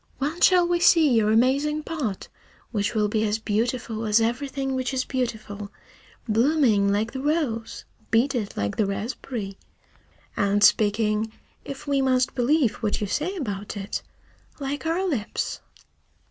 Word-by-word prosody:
When 300 Hz, +5 st, -3 dB
shall 360 Hz, -2 st, +6 dB
we 350 Hz, 0 st, +1 dB
see 335 Hz, -2 st, +6 dB
your 220 Hz, -3 st, +3 dB
amazing 280 Hz, +6 st, +2 dB
pot 290 Hz, -, -4 dB, 0.4 s
which 205 Hz, 0 st, -1 dB
will 210 Hz, -1 st, +2 dB
be 215 Hz, +1 st, 0 dB
as 210 Hz, 0 st, +1 dB
beautiful 225 Hz, +1 st, -2 dB
as 210 Hz, +1 st, +4 dB
everything 270 Hz, +4 st, -1 dB
which 260 Hz, 0 st, -2 dB
is 255 Hz, -, 0 dB
beautiful, 220 Hz, -5 st, -4 dB, 0.6 s
blooming 225 Hz, -3 st, +3 dB
like 215 Hz, +3 st, 0 dB
the 265 Hz, -, -4 dB
rose, 285 Hz, -7 st, -1 dB, 0.2 s
beaded 235 Hz, -2 st, +1 dB
like 100 Hz, 0 st, -2 dB
the 210 Hz, -, +2 dB
raspberry, 200 Hz, 0 st, -5 dB, 0.8 s
and 200 Hz, +1 st, +2 dB
speaking 215 Hz, +1 st, +3 dB, 0.3 s
if 275 Hz, -1 st, -8 dB
we 280 Hz, -2 st, +1 dB
must 255 Hz, -1 st, +2 dB
believe 255 Hz, -2 st, +2 dB
what 210 Hz, -2 st, -1 dB
you 210 Hz, -, -1 dB
say 305 Hz, -, -2 dB
about 210 Hz, -, -4 dB
it 195 Hz, 0 st, -4 dB, 0.6 s
like 285 Hz, +3 st, -3 dB
our 350 Hz, +4 st, 0 dB
lips?" 255 Hz, -, -2 dB
235 Hz, 145 wpm, -25 LUFS, 210-280 Hz, 0.8 s, shall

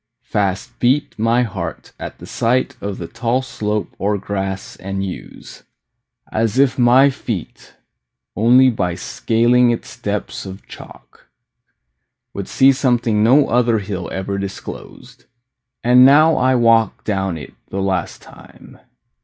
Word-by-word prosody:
Fast 105 Hz, +2 st, -2 dB
beat 130 Hz, +4 st, +1 dB
My 115 Hz, +2 st, +2 dB
heart 110 Hz, -6 st, -6 dB
at -, -, -7 dB
the -, -, -11 dB
sight 130 Hz, +3 st, 0 dB
of 100 Hz, -1 st, -4 dB
the 85 Hz, -, -6 dB
tall 120 Hz, +4 st, -1 dB
slope 105 Hz, -4 st, -3 dB
Or 105 Hz, +1 st, 0 dB
grass 95 Hz, -1 st, -4 dB
and 95 Hz, +1 st, -4 dB
yews, 95 Hz, -, -9 dB, 0.7 s
as 110 Hz, +1 st, -1 dB
if 135 Hz, -1 st, +3 dB
my 130 Hz, +3 st, +5 dB
feet 115 Hz, -, -7 dB, 0.6 s
Only 125 Hz, +4 st, +5 dB
by 90 Hz, -6 st, -2 dB
scaling 120 Hz, +6 st, +2 dB
its 120 Hz, -, -3 dB
steps -, -, -4 dB
of 95 Hz, +1 st, -10 dB
chalk -, -, -14 dB, 1.1 s
Would 100 Hz, -1 st, -5 dB
see 135 Hz, 0 st, +4 dB
something 120 Hz, -5 st, +1 dB
no 135 Hz, +6 st, +5 dB
other 120 Hz, -1 st, +2 dB
hill 95 Hz, -4 st, -5 dB
Ever 100 Hz, +1 st, -3 dB
disclosed. 100 Hz, -1 st, -9 dB, 0.6 s
And 125 Hz, +1 st, +6 dB
now 155 Hz, +4 st, +6 dB
I 130 Hz, +1 st, +2 dB
walk 115 Hz, -2 st, +2 dB
Down 95 Hz, -4 st, -2 dB
it 75 Hz, -, -10 dB, 0.2 s
the 95 Hz, -, -6 dB
last 95 Hz, -3 st, -2 dB
time. -, -, -16 dB
115 Hz, 135 wpm, -18 LUFS, 100-125 Hz, 1.1 s, And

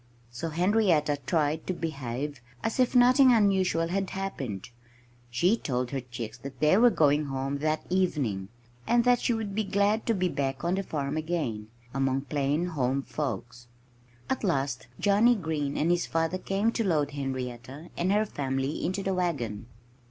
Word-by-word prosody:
So 120 Hz, +8 st, -4 dB
Henrietta 170 Hz, -4 st, +2 dB
tried 155 Hz, -1 st, 0 dB
to 185 Hz, -, 0 dB
behave 140 Hz, -3 st, -4 dB, 0.2 s
as 225 Hz, -, -2 dB
if 255 Hz, 0 st, +2 dB
nothing 255 Hz, +2 st, +7 dB
unusual 190 Hz, -7 st, +3 dB
had 195 Hz, +1 st, -1 dB
happened. 135 Hz, -, -5 dB, 0.6 s
She 170 Hz, -, +3 dB
told 125 Hz, -, -2 dB
her 135 Hz, -1 st, -2 dB
chicks 120 Hz, -2 st, -7 dB
that 135 Hz, +2 st, -9 dB
they 155 Hz, +4 st, +4 dB
were 240 Hz, +2 st, +7 dB
going 150 Hz, -6 st, +3 dB
home 135 Hz, +1 st, -3 dB
that 155 Hz, +1 st, -1 dB
evening, 140 Hz, -, 0 dB, 0.4 s
and 240 Hz, 0 st, +4 dB
that 245 Hz, 0 st, +4 dB
she 240 Hz, -, +1 dB
would 215 Hz, -3 st, -4 dB
be 215 Hz, +2 st, 0 dB
glad 205 Hz, +2 st, +1 dB
to 230 Hz, -, +2 dB
be 185 Hz, -1 st, +1 dB
back 135 Hz, -4 st, -2 dB
on 170 Hz, +1 st, +1 dB
the 195 Hz, -, 0 dB
farm 150 Hz, -5 st, -3 dB
again, 155 Hz, -10 st, -2 dB, 0.3 s
among 135 Hz, 0 st, +1 dB
plain 145 Hz, +3 st, 0 dB
home 135 Hz, -3 st, 0 dB
folks. 125 Hz, -5 st, -5 dB, 0.6 s
At 265 Hz, -, -2 dB
last 135 Hz, -, -1 dB
Johnnie 215 Hz, +4 st, +4 dB
Green 155 Hz, -7 st, -2 dB
and 165 Hz, +3 st, +2 dB
his 175 Hz, 0 st, +1 dB
father 165 Hz, +3 st, 0 dB
came 200 Hz, +4 st, 0 dB
to 230 Hz, -, -1 dB
load 150 Hz, -7 st, +1 dB
Henrietta 130 Hz, +1 st, -5 dB
and 180 Hz, +2 st, 0 dB
her 210 Hz, +1 st, +3 dB
family 135 Hz, -4 st, -2 dB
into 190 Hz, +2 st, -1 dB
the 195 Hz, -, 0 dB
wagon. 130 Hz, -, -2 dB
155 Hz, 165 wpm, -28 LUFS, 135-195 Hz, 0.6 s, nothing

